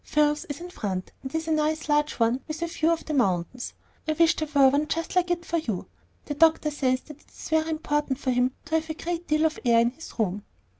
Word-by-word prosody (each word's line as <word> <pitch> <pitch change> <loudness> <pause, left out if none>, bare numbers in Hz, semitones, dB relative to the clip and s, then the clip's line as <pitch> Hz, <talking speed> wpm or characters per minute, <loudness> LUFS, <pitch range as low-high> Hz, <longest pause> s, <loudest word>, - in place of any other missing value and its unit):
Phil's 300 0 +2
is 290 +1 -6
in 355 +1 -8
front, 190 - -4
and 265 +3 -6
is 320 0 -2
a - - 0
nice 310 0 +1
large 295 0 +2
one 235 +3 +1
with 315 +2 -4
a - - +2
view 330 -1 0
of 335 -1 0
the 310 - -3
mountains. 235 -1 0 0.3
I 310 - +2
wish 330 +1 +4
there 310 - -2
were 275 -1 +7
one 290 +3 +1
just 330 +2 -2
like 360 -1 +3
it 345 -1 -1
for 335 - 0
you. 225 - -2 0.4
The 290 - -3
doctor 315 0 +4
says 255 -3 +1
that 300 -1 -13
it's - - -11
very 315 0 +2
important 295 -3 -1
for 265 -1 -1
him 250 +1 +2
to 320 - -9
have 320 0 -11
a 315 - -3
great 345 +1 -4
deal 305 +1 +2
of 315 - 0
air 235 -2 +5
in 235 +1 +3
his 320 +6 -12
room." 205 -2 -1
300 Hz, 250 wpm, -26 LUFS, 255-320 Hz, 0.4 s, were